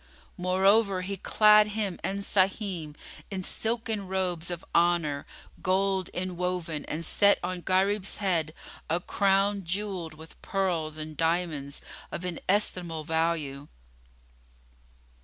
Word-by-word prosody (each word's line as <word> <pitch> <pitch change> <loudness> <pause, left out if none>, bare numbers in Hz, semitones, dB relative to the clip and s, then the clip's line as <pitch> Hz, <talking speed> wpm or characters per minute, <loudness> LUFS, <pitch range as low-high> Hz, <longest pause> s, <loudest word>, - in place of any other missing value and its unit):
Moreover 190 +2 +3
he 200 +2 -3
clad 210 +2 +5
him 200 -5 -1
and 195 +1 -2
Sahim 190 -6 0 0.3
in 190 -2 -4
silken 220 -1 -1
robes 180 -3 -1
of 175 -1 -5
honour 170 -4 +2 0.3
gold 190 0 +1
inwoven 180 -3 -3
and 165 +2 -3
set 200 +5 +5
on 180 0 -3
Gharib's 195 +2 +1
head 165 -6 0 0.3
a 165 +2 +1
crown 195 +2 +1
jewelled 185 -3 -3
with 160 +1 -14
pearls 170 -6 -1
and 155 0 -6
diamonds 160 -3 -1 0.3
of 180 - -5
inestimable 180 -2 0
value. 160 -3 -1
180 Hz, 110 wpm, -28 LUFS, 165-195 Hz, 0.3 s, clad